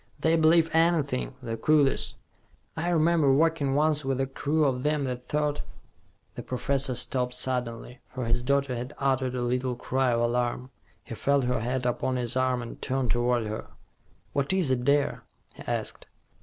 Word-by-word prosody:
They 160 Hz, +1 st, +3 dB
believe 165 Hz, 0 st, +4 dB
anything, 160 Hz, -, +1 dB
the 115 Hz, -, -3 dB
coolies. 150 Hz, -1 st, +2 dB, 0.6 s
I 170 Hz, +2 st, -1 dB
remember 165 Hz, -3 st, +3 dB
working 145 Hz, -1 st, +2 dB
once 150 Hz, 0 st, +2 dB
with 135 Hz, -1 st, -1 dB
a 135 Hz, -, +2 dB
crew 145 Hz, +3 st, 0 dB
of 130 Hz, -2 st, 0 dB
them 150 Hz, +1 st, 0 dB
that 125 Hz, -1 st, -4 dB
thought 150 Hz, -1 st, -1 dB, 0.4 s
" -, -, -38 dB
The -, -, -6 dB
professor 135 Hz, +1 st, -1 dB
stopped 125 Hz, 0 st, -1 dB
suddenly, 125 Hz, -1 st, -2 dB
for 125 Hz, -1 st, -4 dB
his 115 Hz, +1 st, 0 dB
daughter 140 Hz, 0 st, +1 dB
had 125 Hz, +5 st, -6 dB
uttered 130 Hz, -2 st, 0 dB
a 125 Hz, -, -1 dB
little 125 Hz, +1 st, -1 dB
cry 130 Hz, +1 st, 0 dB
of 115 Hz, 0 st, +1 dB
alarm. 120 Hz, +2 st, -1 dB, 0.3 s
He -, -, -8 dB
felt 140 Hz, +4 st, +1 dB
her 125 Hz, 0 st, 0 dB
hand 125 Hz, +2 st, -2 dB
upon 125 Hz, +1 st, 0 dB
his 125 Hz, -1 st, -2 dB
arm, 130 Hz, -1 st, +1 dB
and 115 Hz, -, -9 dB
turned 130 Hz, -3 st, -1 dB
toward 120 Hz, -1 st, +1 dB
her. 110 Hz, +1 st, -5 dB, 0.7 s
"What 140 Hz, +2 st, 0 dB
is 180 Hz, -8 st, +1 dB
it, 125 Hz, -1 st, 0 dB
dear?" 140 Hz, +1 st, +2 dB, 0.3 s
he -, -, -13 dB
asked. -, -, -2 dB
130 Hz, 175 wpm, -27 LUFS, 125-145 Hz, 0.7 s, believe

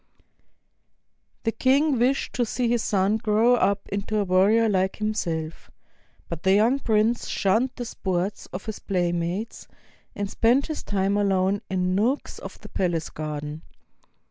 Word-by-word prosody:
The 225 Hz, -, +1 dB
king 270 Hz, +3 st, +2 dB
wished 260 Hz, +3 st, +1 dB
to 245 Hz, -, +1 dB
see 240 Hz, +1 st, -1 dB
his 235 Hz, -1 st, +1 dB
son 200 Hz, +1 st, +2 dB
grow 220 Hz, +2 st, +3 dB
up 200 Hz, -4 st, +1 dB
into 200 Hz, +2 st, -2 dB
a 210 Hz, -, +2 dB
warrior 200 Hz, +5 st, +4 dB
like 190 Hz, -2 st, +1 dB
himself; 170 Hz, -7 st, -3 dB, 0.6 s
but 165 Hz, -2 st, -6 dB
the 190 Hz, +1 st, +4 dB
young 230 Hz, +7 st, +3 dB
prince 225 Hz, -1 st, +1 dB
shunned 220 Hz, +7 st, +1 dB
the 245 Hz, -, -5 dB
sports 190 Hz, -2 st, -3 dB
of 180 Hz, -, -7 dB
his 220 Hz, -1 st, -5 dB
playmates, 175 Hz, +2 st, -2 dB, 0.5 s
and 205 Hz, 0 st, -2 dB
spent 240 Hz, +7 st, +2 dB
his 310 Hz, -, -5 dB
time 200 Hz, 0 st, 0 dB
alone 195 Hz, -1 st, +1 dB
in 185 Hz, -1 st, 0 dB
nooks 235 Hz, +9 st, 0 dB
of -, -, -9 dB
the -, -, -11 dB
palace 170 Hz, -4 st, -1 dB
garden. 150 Hz, 0 st, -5 dB
205 Hz, 145 wpm, -25 LUFS, 185-230 Hz, 0.6 s, warrior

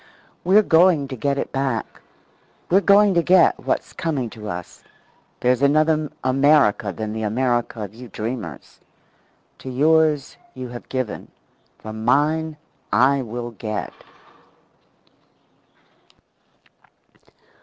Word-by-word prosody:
We're 195 Hz, +4 st, +5 dB
going 165 Hz, -5 st, +4 dB
to 130 Hz, -, -5 dB
get 140 Hz, +3 st, -1 dB
it -, -, -3 dB
back. 135 Hz, -5 st, -3 dB, 0.7 s
We're 195 Hz, +3 st, +5 dB
going 200 Hz, 0 st, +5 dB
to 170 Hz, -, +3 dB
get 180 Hz, 0 st, +4 dB
what's -, -, -3 dB
coming 140 Hz, -8 st, -3 dB
to 105 Hz, -1 st, -8 dB
us. 90 Hz, -1 st, -8 dB, 0.6 s
There's 125 Hz, +1 st, +2 dB
another 155 Hz, +1 st, +2 dB
America 130 Hz, -6 st, +3 dB
than 110 Hz, +3 st, -5 dB
the 110 Hz, -, -4 dB
America 120 Hz, 0 st, -1 dB
of 100 Hz, 0 st, -8 dB
you 120 Hz, +2 st, -11 dB
dreamers. 110 Hz, -, -7 dB, 0.8 s
To 130 Hz, -, -8 dB
yours 150 Hz, +1 st, +2 dB, 0.2 s
you 130 Hz, -1 st, -7 dB
have 120 Hz, 0 st, -10 dB
given; 130 Hz, -4 st, -4 dB, 0.5 s
from 110 Hz, 0 st, -8 dB
mine 155 Hz, +4 st, +1 dB, 0.3 s
I 135 Hz, +5 st, +3 dB
will 120 Hz, 0 st, -6 dB
get. 110 Hz, -2 st, -5 dB
130 Hz, 110 wpm, -21 LUFS, 115-155 Hz, 0.8 s, We're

